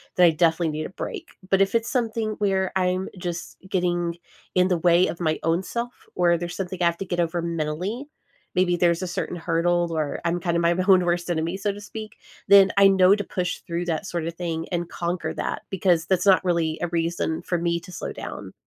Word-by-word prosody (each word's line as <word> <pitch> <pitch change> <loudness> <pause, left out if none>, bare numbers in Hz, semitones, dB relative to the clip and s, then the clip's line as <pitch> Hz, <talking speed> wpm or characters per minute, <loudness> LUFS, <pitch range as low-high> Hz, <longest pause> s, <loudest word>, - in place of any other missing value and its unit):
then 180 - +6
I - - +7
definitely 165 +1 +2
need 155 0 -3
a - - -6
break. 355 - -6 0.2
But 195 0 +3
if 195 +2 +2
it's 230 0 +1
something 225 -5 -1
where 190 -2 +1
I'm 185 0 +1
just 175 -1 -5
getting 175 -2 0 0.4
in 180 0 +4
the 180 -2 +1
way 175 +1 +4
of 170 - -5
my 160 -3 0
own 165 +2 +2
self 235 +4 -4 0.2
or 175 -1 +3
there's 175 +1 -5
something 185 -1 -4
I - - +4
have 170 0 +2
to 195 - -5
get 175 -1 -3
over 170 0 0
mentally, 170 - -3 0.5
maybe 180 -1 +3
there's 170 -1 +2
a 185 - -2
certain 175 0 -3
hurdle 170 +1 +1
or 150 -2 -2
I'm 170 +1 +1
kinda 170 -1 0
my 170 0 +3
my 185 - 0
own 185 -2 +6
worst 175 0 0
enemy, 170 +2 -1
so 205 +1 -1
to 205 +1 -9
speak, 215 +1 -8 0.3
then 200 -1 +7
I 200 - +8
know 190 0 +6
to 205 - -3
push 180 -2 -3
through 170 +1 -2
that 165 +2 -2
sort 170 -4 -3
of 165 - -5
thing 165 -2 -3
and 175 -1 -2
conquer 175 +1 -3
that - - -3
because 180 -3 +2
that's 185 -1 +1
not 195 -1 +5
really 165 -3 +1
a 175 - 0
reason 165 -1 -1
for 175 - -1
me 170 0 0
to 180 - -12
slow 175 - -5
down. - - -7
175 Hz, 225 wpm, -24 LUFS, 170-190 Hz, 0.5 s, I